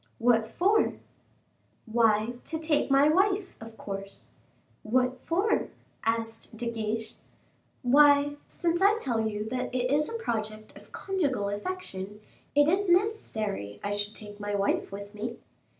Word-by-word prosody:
"What 230 -2 +3
for?" 405 +5 +2 0.9
"Why, 225 0 +2
to 320 - -2
take 310 -2 +1
my 275 +1 +5
wife, 380 +4 +2
of 225 0 -10
course." 195 0 -7 0.5
"What 250 +3 +1
for?" 385 +6 +1 0.4
asked 225 0 -2
De 235 +1 -2
Guiche. 220 0 -3 0.7
"Why, 285 +2 +5
since 345 0 -1
I 405 +3 +5
tell 240 - -1
you 210 0 -3
that 250 +1 -2
it 250 0 0
is 300 +1 +2
a - - -6
project 215 - -4
of - - -15
conjugal 285 - -1
affection, 205 - -5 0.4
it 290 0 +6
is 380 +4 +2
necessary 220 - 0
I 205 - -1
should 205 +1 -2
take 210 -1 -10
my 205 0 -2
wife 200 -1 0
with 200 +1 -8
me." 230 +3 -5
235 Hz, 140 wpm, -28 LUFS, 215-315 Hz, 0.9 s, it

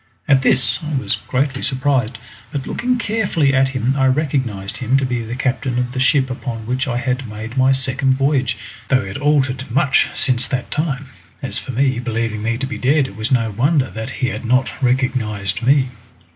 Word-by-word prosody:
At 135 -3 +5
this 130 -2 +3
I 155 -1 -3
was 130 - 0
greatly 135 +1 0
surprised, 130 -4 +1 0.3
but 140 -2 -3
looking 250 +1 0
carefully 200 -11 +1
at 135 0 +3
him 130 -1 0
I 135 -1 +3
recognised 130 -8 -1
him 125 +1 +2
to 135 - +1
be 125 -2 -1
the 115 +2 -5
captain 130 -1 -1
of 125 0 -1
the 130 - -4
ship 130 0 +3
upon 120 -3 -5
which 130 +3 -1
I 120 -2 -1
had 125 0 -2
made 110 +3 -7
my 130 0 +4
second 130 0 +1
voyage, 135 -3 +1 0.3
though 130 -2 +3
he 100 - -6
had 100 - -5
altered 135 -3 +1
much 135 +2 +3
since 125 -2 +1
that 125 -2 -3
time. 145 -3 -2 0.3
As - - -2
for 130 - -7
him, 130 0 +1
believing 115 -2 -2
me 115 +2 -1
to 135 - -2
be 135 - -5
dead 140 +1 +2
it 100 - -13
was 110 +5 -3
no 115 -4 +2
wonder 135 +5 +1
that 110 +2 -5
he 130 -1 -1
had - - -5
not 125 +2 +2
recognised 120 -6 0
me. 130 +1 +3
130 Hz, 200 wpm, -19 LUFS, 120-135 Hz, 0.3 s, At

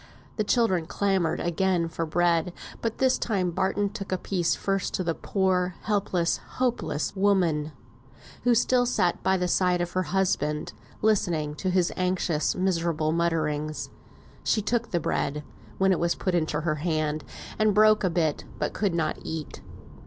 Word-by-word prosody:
The 215 - +2
children 205 -7 +2
clamoured 190 -5 0
again 175 0 +1
for 165 0 -3
bread; 170 +1 +1 0.3
but 225 -1 -2
this 260 -1 +2
time 190 -6 0
Barton 195 +3 0
took 200 -3 -7
a 185 - +1
piece 180 -2 0
first 195 -1 -1
to 185 - -1
the 165 -1 0
poor, 185 -1 0
helpless, 195 -5 +1 0.2
hopeless 245 -10 -1
woman, 180 -6 +2 0.7
who 245 -1 +4
still 245 +1 +3
sat 185 -8 +1
by 190 0 +2
the 180 0 0
side 180 0 +2
of 175 0 -2
her 185 - 0
husband, 150 - 0 0.3
listening 170 -8 +1
to 190 - -1
his 180 -1 +2
anxious 180 -4 0
miserable 170 -4 0
mutterings. 155 -2 -1 0.5
She 215 - +1
took 235 +2 0
the 175 - 0
bread, 150 -1 -1 0.3
when 190 0 +3
it 185 - +2
was 170 0 +1
put 185 - -2
into 155 -3 0
her 155 -1 -1
hand, 155 -2 -1 0.4
and 215 -2 +3
broke 215 0 +5
a 185 - +3
bit, 165 -3 0
but - - -2
could 200 -5 0
not 160 -2 -1
eat. 160 -2 -6
180 Hz, 160 wpm, -26 LUFS, 165-195 Hz, 0.7 s, broke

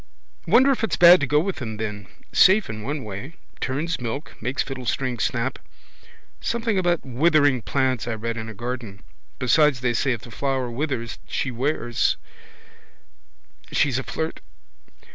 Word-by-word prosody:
Wonder 250 +9 +6
if 260 - -1
it's 225 - +1
bad 175 +1 +9
to 145 - -1
go 150 +3 +3
with 190 +4 -2
them 110 -5 -5
then. 105 -2 -5 0.3
Safe 195 +2 +6
in 110 -1 -7
one 140 +6 -3
way. 110 - -7 0.2
Turns 150 +3 -2
milk, 120 +5 -5
makes 125 +5 -1
fiddlestrings 130 -2 -3
snap. 120 +4 -1 0.8
Something 230 -4 0
about 175 -4 +1
withering 145 0 +3
plants 130 -1 0
I 115 - -1
read 115 +1 -3
in 110 -1 -5
a 110 - -9
garden. 120 -3 -6 0.3
Besides 135 0 +3
they 125 -2 +1
say 130 +3 +1
if 115 - -6
the 120 - -12
flower 130 0 -1
withers 120 -3 -3
she 135 - -2
wears 125 -1 0 1.5
she's 135 -3 +2
a - - -4
flirt. 160 +4 -4
130 Hz, 155 wpm, -24 LUFS, 115-155 Hz, 1.5 s, bad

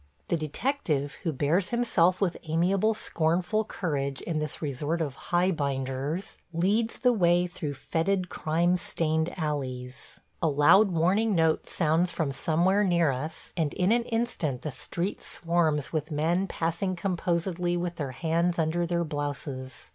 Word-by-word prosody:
The - - +2
detective, 155 - -2
who 165 - -1
bears 155 +7 +1
himself 185 -7 +2
with 180 -4 +1
amiable, 190 +7 +2
scornful 180 +5 0
courage 140 -9 -2
in 165 -3 -2
this 150 0 -4
resort 150 +3 -2
of 145 -5 -2
"Highbinders," 145 -2 -1
leads 205 +7 +1
the 250 -2 +3
way 175 -4 +3
through 165 -5 -5
fetid, 180 +6 0
crime 170 +2 +1
stained 160 -1 -1
alleys. 130 -5 -4 0.2
A - - +3
loud 150 +8 +5
warning 190 +6 +2
note 160 -1 +2
sounds 165 +2 +2
from 160 -5 -1
somewhere 175 +8 +2
near 170 -6 +3
us, 150 +5 -6
and 155 -4 -1
in 185 +3 +2
an 235 0 +3
instant 225 - -2
the 150 - -3
street 175 +8 -4
swarms 165 -4 0
with 155 -1 -1
men 165 +5 +1
passing 170 +3 -1
composedly 175 -1 -1
with 175 0 -3
their 140 -4 -3
hands 170 +4 0
under 170 +1 +1
their 170 0 0
blouses. 145 -4 -5
170 Hz, 145 wpm, -28 LUFS, 150-180 Hz, 0.2 s, loud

